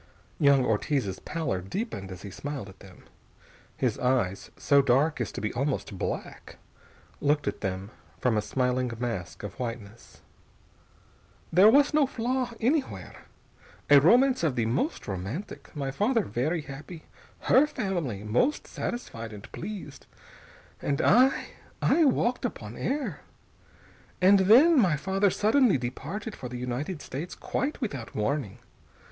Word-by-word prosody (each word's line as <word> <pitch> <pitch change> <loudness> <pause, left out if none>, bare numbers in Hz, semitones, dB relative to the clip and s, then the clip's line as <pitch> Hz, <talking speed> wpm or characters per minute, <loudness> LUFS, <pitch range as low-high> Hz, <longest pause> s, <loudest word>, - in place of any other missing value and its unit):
Young 140 -3 +5
Ortiz's 110 -2 0
pallor 155 - -3
deepened 100 - -5
as 90 - -9
he 100 - -7
smiled 140 -3 -6
at 95 - -16
them. 95 -2 -15 0.7
His - - 0
eyes, 125 -7 0
so 140 -1 +4
dark 135 +2 +2
as 120 - -2
to - - -5
be 110 - -2
almost 130 -5 -2
black, - - -5 0.6
looked 145 0 +1
at - - -3
them 95 +1 -4 0.3
from 125 -3 +1
a 105 - +2
smiling 125 +2 0
mask 115 -9 -4
of 105 - -5
whiteness. 115 -3 -7 1.3
"There 190 +5 +8
was 285 +5 +5
no 300 -2 +4
flaw 250 +1 -1
anywhere. 270 +4 -2 0.7
A 145 -1 +9
romance 250 - +5
of 150 -6 +1
the 115 -3 +1
most 135 - -1
romantic, 100 - -5
my 140 -2 -2
father 220 - +1
very 155 +7 -1
happy, 150 +4 -9 0.4
her 280 +3 +5
family 175 - -3
most 120 - +1
satisfied 115 - -5
and 105 -2 -10
pleased, 185 -7 -8 0.7
and 140 -1 -1
I 255 +6 +4 0.3
I 330 - +3
walked 250 -2 +1
upon 115 - -5
air. 285 +2 -2 1.0
And 195 +2 +6
then 260 - +6
my 180 -9 +3
father 195 +5 +1
suddenly 220 - +3
departed 160 - -5
for 125 - -7
the 125 - -6
United 125 +7 -4
States, 150 +7 -6
quite 280 +3 -3
without 140 - -5
warning. 110 -1 -1
145 Hz, 140 wpm, -27 LUFS, -, 1.3 s, A